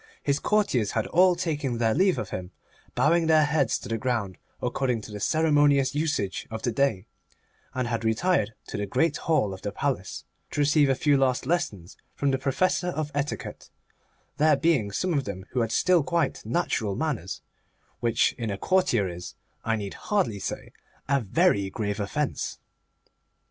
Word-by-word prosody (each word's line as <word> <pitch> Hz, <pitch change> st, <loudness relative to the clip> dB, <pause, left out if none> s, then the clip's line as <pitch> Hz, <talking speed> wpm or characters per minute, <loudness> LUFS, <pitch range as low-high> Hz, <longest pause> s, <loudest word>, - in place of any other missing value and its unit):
His 140 Hz, 0 st, +1 dB
courtiers 165 Hz, -, +1 dB
had 110 Hz, -, 0 dB
all 180 Hz, +1 st, +4 dB
taken 150 Hz, -8 st, -2 dB
their 115 Hz, -1 st, +2 dB
leave 185 Hz, -, +3 dB
of -, -, -4 dB
him, 90 Hz, -1 st, -5 dB, 0.5 s
bowing 160 Hz, +6 st, +3 dB
their 155 Hz, -1 st, +5 dB
heads 145 Hz, -5 st, +1 dB
to -, -, -9 dB
the 115 Hz, -1 st, -2 dB
ground, 115 Hz, -8 st, -2 dB, 0.2 s
according 125 Hz, -4 st, -1 dB
to 105 Hz, -, -10 dB
the 105 Hz, -, -6 dB
ceremonious 145 Hz, 0 st, +3 dB
usage 145 Hz, -11 st, -1 dB
of 110 Hz, 0 st, -6 dB
the 120 Hz, -, +1 dB
day, 110 Hz, -6 st, +1 dB, 0.7 s
and 130 Hz, -1 st, -1 dB
had 115 Hz, -1 st, -2 dB
retired 110 Hz, -, +1 dB
to -, -, -4 dB
the 100 Hz, 0 st, -2 dB
Great 155 Hz, -, +1 dB
Hall 110 Hz, -12 st, +1 dB
of 95 Hz, -, -9 dB
the 100 Hz, -, -3 dB
Palace, -, -, -3 dB, 0.2 s
to -, -, -4 dB
receive 145 Hz, 0 st, +4 dB
a 135 Hz, -, +3 dB
few 145 Hz, +1 st, +3 dB
last 130 Hz, -2 st, +1 dB
lessons 105 Hz, -, -2 dB, 0.2 s
from 140 Hz, -1 st, +1 dB
the 135 Hz, -, 0 dB
Professor 160 Hz, +7 st, +1 dB
of 155 Hz, -4 st, -2 dB
Etiquette; 145 Hz, +1 st, -4 dB, 0.7 s
there 155 Hz, 0 st, +5 dB
being 135 Hz, -9 st, +2 dB
some 180 Hz, -, -1 dB
of 140 Hz, -4 st, 0 dB
them 95 Hz, -2 st, -6 dB
who 125 Hz, -, 0 dB
had 115 Hz, -1 st, -1 dB
still 180 Hz, +5 st, +3 dB
quite 150 Hz, 0 st, -1 dB
natural 110 Hz, -, -1 dB
manners, 130 Hz, -, -3 dB, 0.6 s
which 115 Hz, -1 st, +2 dB
in 115 Hz, -2 st, -2 dB
a 100 Hz, -, -3 dB
courtier 125 Hz, -, +2 dB
is, 90 Hz, 0 st, -7 dB, 0.3 s
I 115 Hz, -, +1 dB
need 100 Hz, -3 st, -5 dB
hardly 185 Hz, -, -1 dB
say, -, -, -5 dB, 0.4 s
a 140 Hz, 0 st, +3 dB
very 115 Hz, -, +2 dB
grave 105 Hz, +1 st, -3 dB
offence. 135 Hz, +8 st, -2 dB
135 Hz, 175 wpm, -26 LUFS, 110-155 Hz, 0.7 s, their